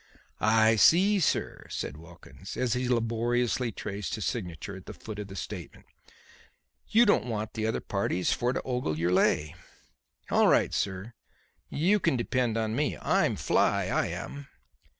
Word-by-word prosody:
"I 110 +1 +4
see, 190 - +5
sir," 165 - -1
said - - -4
Wilkins, 85 +3 -11
as 125 -3 +1
he 125 0 -1
laboriously 120 +1 0
traced 100 -4 -4
his - - -4
signature 90 +3 -4
at 95 - -12
the - - -8
foot 110 -2 -8
of 105 - -5
the 95 - -10
statement; 80 - -7 1.0
"you 235 +2 +5
don't 205 - +3
want 110 -2 -3
the 110 -1 -2
other 110 - -1
parties 100 -3 0
for 120 +1 0
to - - -3
ogle 125 -12 -2
your 85 +2 0
lay. 75 -4 +2 0.8
All - - +5
right, - - +3
sir; 95 +4 -2 0.6
you 190 +8 +2
can 165 -8 +1
depend 120 -1 0
on 110 0 -1
me. 145 +2 0
I'm - - +1
fly, - - +1
I - - +1
am." 140 0 -6
115 Hz, 160 wpm, -28 LUFS, 100-125 Hz, 1.0 s, see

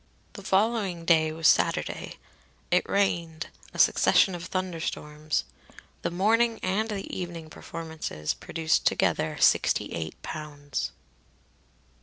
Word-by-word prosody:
The 200 - -9
following 195 -3 +1
day 160 -2 +4
was 160 -1 +1
Saturday. - - +1 0.6
It 180 - +2
rained 170 -5 0 0.2
a - - -11
succession 190 - +5
of 175 0 -6
thunderstorms. 160 -5 -2 0.6
The - - -1
morning 225 +6 +2
and 205 +4 0
the 200 -2 -3
evening 170 -3 -6
performances 160 - -5
produced 160 0 0
together - - +1
sixty - - +3
eight 80 -1 -5
pounds. 145 - -4
170 Hz, 110 wpm, -27 LUFS, 155-195 Hz, 0.6 s, succession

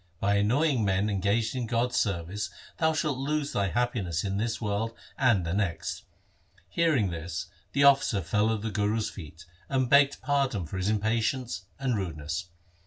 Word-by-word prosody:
By 100 +1 +2
annoying 125 +5 +2
men 100 +1 +1
engaged 105 +5 +1
in 125 -3 -2
God's 120 +2 0
service 100 0 -1 0.3
thou 160 -1 +3
shalt 150 -4 -1
lose 145 +1 -1
thy 100 -1 +1
happiness 100 -7 -1
in 100 -1 -1
this 110 +2 -1
world 110 +1 -2 0.2
and 120 -9 +3
the 85 - -2
next.' 100 -4 -2 0.6
Hearing 140 - +2
this 85 0 -5 0.2
the 140 - +3
officer 135 -7 +5
fell 105 +6 +2
at 110 -2 -1
the 110 0 -3
Guru's 105 +1 0
feet, 80 -1 -10 0.2
and 130 -2 0
begged 140 0 +5
pardon 135 - +1
for 80 - -6
his 95 +2 0
impatience 110 0 0
and 130 -3 0
rudeness. 80 -4 -4
110 Hz, 165 wpm, -28 LUFS, 95-130 Hz, 0.6 s, officer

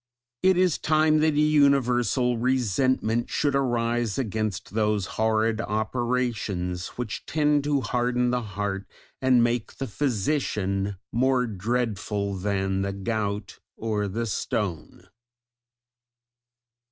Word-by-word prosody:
It 190 -1 +4
is 180 -3 +2
time 155 0 +3
that 155 -1 +2
a - - +2
universal 130 -5 +3
resentment 120 -1 +1
should 145 -2 0
arise 120 -5 0
against 110 -5 -2
those 105 -2 +1
horrid 110 +1 +1
operations, 110 -6 -1
which 120 -3 -4
tend 150 -2 +2
to 145 -2 +1
harden 125 +1 0
the 125 0 0
heart 100 -2 -4 0.3
and 130 -2 +4
make 120 -1 -1
the 135 - -4
physician 105 -6 -1
more 130 +1 +2
dreadful 105 -2 -2
than 95 0 -1
the 100 0 -2
gout 100 0 -3 0.2
or 105 -2 -1
the 115 +4 -2
stone. 100 -4 -3
115 Hz, 110 wpm, -26 LUFS, 105-130 Hz, 0.3 s, It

